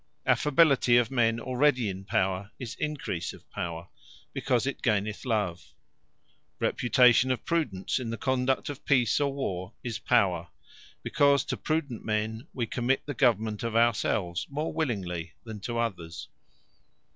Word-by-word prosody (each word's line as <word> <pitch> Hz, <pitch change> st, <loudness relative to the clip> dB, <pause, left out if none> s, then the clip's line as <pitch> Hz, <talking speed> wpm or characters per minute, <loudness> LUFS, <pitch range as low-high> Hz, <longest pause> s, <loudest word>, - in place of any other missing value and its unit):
Affability 140 Hz, -5 st, +4 dB
of 120 Hz, -1 st, +2 dB
men 115 Hz, -3 st, +2 dB
already 130 Hz, -1 st, +2 dB
in 95 Hz, 0 st, -5 dB
power, 95 Hz, +1 st, 0 dB
is 120 Hz, -4 st, -6 dB
encrease 145 Hz, -, -3 dB
of -, -, -16 dB
Power; 85 Hz, 0 st, -5 dB, 0.5 s
because 125 Hz, -2 st, 0 dB
it 135 Hz, -, -3 dB
gaineth 105 Hz, -2 st, 0 dB
love. 90 Hz, -, -2 dB, 0.9 s
Reputation 125 Hz, 0 st, +4 dB
of 130 Hz, -3 st, -1 dB
Prudence 135 Hz, -, -1 dB
in 120 Hz, -3 st, -4 dB
the 115 Hz, -, -3 dB
conduct 130 Hz, +3 st, 0 dB
of 145 Hz, -1 st, -6 dB
Peace 125 Hz, -5 st, +3 dB
or 140 Hz, -1 st, +1 dB
War, 95 Hz, -9 st, -4 dB
is 120 Hz, -2 st, -4 dB
Power; 90 Hz, -3 st, +2 dB, 0.6 s
because 140 Hz, -2 st, +3 dB
to -, -, -3 dB
prudent 150 Hz, -7 st, -2 dB
men, 110 Hz, +4 st, -2 dB
we 120 Hz, -, -2 dB
commit 120 Hz, +3 st, 0 dB
the 145 Hz, -, -4 dB
government 110 Hz, -4 st, +1 dB
of 115 Hz, -1 st, -3 dB
our 120 Hz, +1 st, +5 dB
selves, 90 Hz, -4 st, -1 dB
more 150 Hz, +3 st, -3 dB
willingly 90 Hz, -, -2 dB
than 110 Hz, -2 st, -7 dB
to 120 Hz, +4 st, -4 dB
others. 90 Hz, -8 st, -4 dB
115 Hz, 145 wpm, -28 LUFS, 100-130 Hz, 0.9 s, our